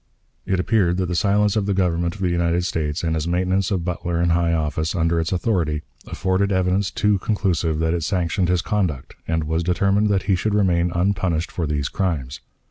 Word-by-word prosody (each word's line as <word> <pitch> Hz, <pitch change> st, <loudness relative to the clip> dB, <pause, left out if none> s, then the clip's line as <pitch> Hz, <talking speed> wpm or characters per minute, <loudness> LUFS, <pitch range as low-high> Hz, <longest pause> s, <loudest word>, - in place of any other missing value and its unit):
It 95 Hz, -1 st, +1 dB
appeared 90 Hz, -3 st, +2 dB
that 95 Hz, -, 0 dB
the 90 Hz, -, -3 dB
silence 105 Hz, +1 st, +2 dB
of 105 Hz, -2 st, 0 dB
the 100 Hz, -, +1 dB
Government 85 Hz, -1 st, 0 dB
of 100 Hz, -, -11 dB
the 90 Hz, -2 st, +1 dB
United 85 Hz, 0 st, +1 dB
States 75 Hz, -3 st, -2 dB
and 80 Hz, -1 st, 0 dB
its 80 Hz, +1 st, -2 dB
maintenance 95 Hz, +2 st, 0 dB
of 95 Hz, -5 st, -1 dB
Butler 85 Hz, -1 st, -2 dB
in 85 Hz, 0 st, +2 dB
high 85 Hz, 0 st, +2 dB
office, 80 Hz, +1 st, -1 dB
under 85 Hz, -1 st, +1 dB
its 80 Hz, -, -2 dB
authority, 85 Hz, -6 st, 0 dB, 0.2 s
afforded 95 Hz, +2 st, 0 dB
evidence 95 Hz, +1 st, +1 dB
too 105 Hz, -2 st, +1 dB
conclusive 90 Hz, -6 st, 0 dB
that 80 Hz, +1 st, 0 dB
it 85 Hz, -, -1 dB
sanctioned 90 Hz, 0 st, 0 dB
his 90 Hz, -3 st, +1 dB
conduct, 85 Hz, -7 st, -2 dB
and 80 Hz, -1 st, 0 dB
was 80 Hz, +2 st, -1 dB
determined 100 Hz, +4 st, +2 dB
that 100 Hz, -2 st, +1 dB
he 100 Hz, -, +1 dB
should 105 Hz, +4 st, -1 dB
remain 90 Hz, -4 st, +2 dB
unpunished 90 Hz, -2 st, 0 dB
for 85 Hz, -4 st, -2 dB
these 75 Hz, -2 st, -1 dB
crimes. 75 Hz, -9 st, -2 dB
90 Hz, 205 wpm, -22 LUFS, 85-95 Hz, 0.2 s, appeared